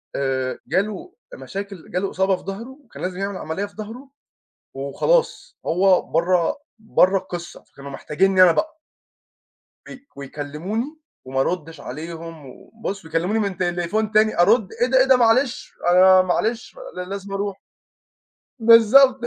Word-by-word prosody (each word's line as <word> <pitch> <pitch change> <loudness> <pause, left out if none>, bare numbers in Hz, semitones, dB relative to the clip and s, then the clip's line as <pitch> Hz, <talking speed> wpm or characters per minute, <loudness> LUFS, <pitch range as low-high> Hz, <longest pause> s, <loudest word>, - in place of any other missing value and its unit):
آآ 130 -1 -2
جاله 210 - -2 0.2
مشاكل 195 - -8
جاله 190 +2 -1
إصابة 190 +1 +1
في - - -16
ضهره 230 +8 -8
كان - - -11
لازم 180 0 -4
يعمل 195 -1 -3
عملية 160 +6 -4
في 205 - -15
ضهره 225 +6 -9 0.7
وخلاص 455 - -1
هو 185 +2 +3
برّا 170 +1 +1 0.2
برّا 195 -3 +3
القصّة 175 -2 -8
فكانوا 140 0 -12
محتاجينّي 185 +7 +2
أنا 180 -2 +7
بقى. 315 - -2 1.1
وي 275 +1 -12
ويكلموني 150 - -5 0.3
وما 135 +1 -3
أردش 165 0 -3
عليهم، 165 +2 -8
وبُص 195 - -8
ويكلموني 170 +7 -1
من 200 -4 -2
تليفون 180 +4 -1
تاني 215 -1 +2
أرد 205 +2 +4
إيه 245 - +4
ده 260 +1 +2
إيه 260 - +5
ده 265 -1 +5
معلش 240 +2 +1 0.2
أنا 185 +1 +7
معلش 220 - -2 0.3
لازم 195 +1 -6
أروح. 200 -1 -3 1.0
بالضبط 230 +4 +6
195 Hz, 135 wpm, -22 LUFS, 170-220 Hz, 1.1 s, أنا